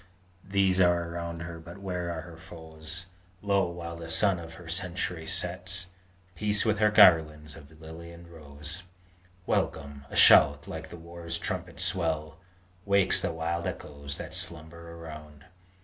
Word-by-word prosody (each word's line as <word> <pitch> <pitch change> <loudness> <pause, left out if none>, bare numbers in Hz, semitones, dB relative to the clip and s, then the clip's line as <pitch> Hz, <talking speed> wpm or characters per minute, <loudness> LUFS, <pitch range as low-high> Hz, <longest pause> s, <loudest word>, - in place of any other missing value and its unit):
These 95 -1 +2
are 85 -1 +2
around 85 -1 -5
her; 85 -1 -7
but 85 +3 -11
where 90 -3 -3
are 80 -1 -4
her 85 0 -11
foes? 80 +1 -9 0.4
Lo, 100 -3 +2
while 85 -1 -6
the 85 0 -8
sun 95 +2 +3
of 80 0 -9
her 90 -3 -12
century 90 -1 -2
sets, 90 0 -2 0.4
Peace 105 +1 0
with 105 -2 +1
her 105 -1 +5
garlands 80 -7 +5
of 80 0 -15
lily 80 +1 -10
and 85 0 -13
rose! 75 0 -9 0.6
Welcome! 70 -1 -2
a - - -8
shout - - +7
like - - -7
the - - -9
war 85 0 -10
trumpet's 85 +1 -2
swell 80 -3 -1 0.4
Wakes 100 -1 +3
the - - -1
wild 85 +2 -2
echoes 70 -5 -6
that - - -7
slumber 85 +1 -5
around! 75 -3 -10
85 Hz, 150 wpm, -29 LUFS, 80-90 Hz, 0.6 s, shout